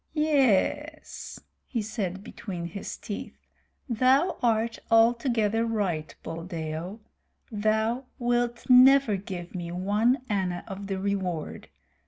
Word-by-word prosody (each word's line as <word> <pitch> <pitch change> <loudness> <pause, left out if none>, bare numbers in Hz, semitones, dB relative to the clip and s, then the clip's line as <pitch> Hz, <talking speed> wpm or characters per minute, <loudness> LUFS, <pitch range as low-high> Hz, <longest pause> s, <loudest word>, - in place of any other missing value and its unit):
"Ye 310 0 +1 0.6
es," - - -10 0.3
he 230 -4 -2
said, 200 -3 -4
between 180 -6 -6
his 180 +4 -6
teeth. 205 - -7 0.5
"Thou 260 +7 +3
art 230 -1 +1
altogether 225 -1 +3
right, 195 -9 -2
Buldeo. 165 +3 -5 0.5
Thou 220 +4 0
wilt 240 0 0
never 255 -2 +7
give 185 -2 -7
me 175 -2 -5
one 210 +8 +1
anna 185 -4 -1
of 200 -1 -7
the 195 -1 -2
reward. 190 -4 -3
210 Hz, 110 wpm, -27 LUFS, 185-235 Hz, 0.6 s, never